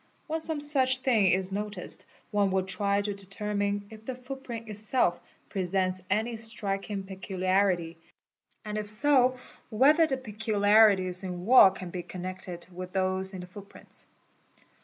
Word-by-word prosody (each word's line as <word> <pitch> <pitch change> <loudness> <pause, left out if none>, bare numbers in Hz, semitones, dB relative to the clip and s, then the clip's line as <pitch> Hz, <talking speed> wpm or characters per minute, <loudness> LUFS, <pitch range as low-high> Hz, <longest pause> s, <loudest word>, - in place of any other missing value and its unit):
When 320 +1 -2
some 320 -1 -2
such 270 -3 +2
thing 230 -7 +3
is 185 +1 +1
noticed 205 -1 -5
— - - -36
one 205 -1 +2
will 190 0 +1
try 200 +1 0
to 205 0 -2
determine 200 +1 -2
if 220 0 -12
the 255 +2 -5
footprint 250 -3 -8
itself 210 -3 0 0.3
presents 185 0 -1
any 220 +4 0
striking 205 -3 -3
peculiarity, 185 -3 -1 0.7
and 210 0 -3
if 210 -1 -4
so 255 +2 +3 0.3
whether 295 +8 +5
the 265 -3 -1
peculiarities 210 -4 +3
in 180 -1 -5
walk 215 -5 +7
can 180 -2 -7
be 180 - -4
connected 180 0 -7
with 180 +1 -8
those 190 0 0
in 185 - -6
the - - -8
footprints. 195 +2 -11
205 Hz, 145 wpm, -28 LUFS, 185-225 Hz, 0.7 s, walk